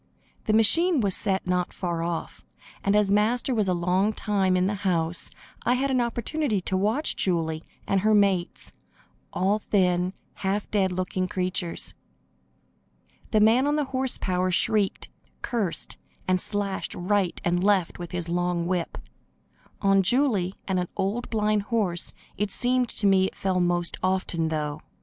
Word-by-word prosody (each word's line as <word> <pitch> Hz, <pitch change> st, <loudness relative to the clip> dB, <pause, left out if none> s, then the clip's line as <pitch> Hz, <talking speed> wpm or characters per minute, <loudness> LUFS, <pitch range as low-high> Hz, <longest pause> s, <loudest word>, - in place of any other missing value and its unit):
The 215 Hz, -, +1 dB
machine 330 Hz, -, +4 dB
was 200 Hz, -5 st, +1 dB
set 195 Hz, -2 st, -1 dB
not 180 Hz, -1 st, 0 dB
far 170 Hz, -3 st, -3 dB
off, 170 Hz, 0 st, -4 dB, 0.4 s
and 200 Hz, +1 st, +2 dB
as 210 Hz, -2 st, +3 dB
Master 230 Hz, +5 st, +2 dB
was 215 Hz, -4 st, +1 dB
a 185 Hz, -, +2 dB
long 180 Hz, +5 st, +1 dB
time 195 Hz, -4 st, +1 dB
in 180 Hz, -, +2 dB
the 200 Hz, -, 0 dB
house, 170 Hz, -3 st, +1 dB, 0.3 s
I 245 Hz, -, +2 dB
had 270 Hz, +2 st, 0 dB
an 255 Hz, -2 st, +2 dB
opportunity 235 Hz, 0 st, -1 dB
to 190 Hz, -, -2 dB
watch 215 Hz, +11 st, +1 dB
Julie 160 Hz, -4 st, -1 dB, 0.2 s
and 195 Hz, -, +1 dB
her 215 Hz, +1 st, +3 dB
mates 195 Hz, -4 st, +1 dB, 0.6 s
all 195 Hz, +3 st, +1 dB
thin, 180 Hz, -3 st, +1 dB, 0.2 s
half 200 Hz, +1 st, -2 dB
dead 195 Hz, -3 st, +2 dB
looking 185 Hz, 0 st, -2 dB
creatures. 180 Hz, -1 st, -1 dB, 1.4 s
The 215 Hz, -, +3 dB
man 235 Hz, +6 st, +4 dB
on 295 Hz, -, +2 dB
the 300 Hz, -, +1 dB
horse 260 Hz, -1 st, +1 dB
power 185 Hz, 0 st, 0 dB
shrieked, 200 Hz, +2 st, +1 dB, 0.3 s
cursed 215 Hz, -8 st, -2 dB, 0.3 s
and 185 Hz, 0 st, +2 dB
slashed 200 Hz, -2 st, 0 dB
right 190 Hz, 0 st, 0 dB
and 175 Hz, +1 st, +1 dB
left 195 Hz, -5 st, +2 dB
with 175 Hz, -1 st, -6 dB
his 175 Hz, -2 st, -3 dB
long 175 Hz, 0 st, 0 dB
whip. 175 Hz, -1 st, -2 dB, 0.9 s
On 195 Hz, 0 st, +5 dB
Julie 200 Hz, -4 st, +1 dB
and 190 Hz, -2 st, 0 dB
an 180 Hz, -, -2 dB
old 205 Hz, +6 st, -2 dB
blind 210 Hz, -1 st, +1 dB
horse 200 Hz, -5 st, -1 dB, 0.2 s
it 205 Hz, +1 st, -1 dB
seemed 250 Hz, +3 st, +1 dB
to 205 Hz, -, -3 dB
me 190 Hz, -1 st, +5 dB
it -, -, -5 dB
fell 190 Hz, -1 st, 0 dB
most 175 Hz, -1 st, +1 dB
often, 185 Hz, -3 st, 0 dB
though. 150 Hz, -1 st, -3 dB
190 Hz, 160 wpm, -26 LUFS, 180-215 Hz, 1.4 s, On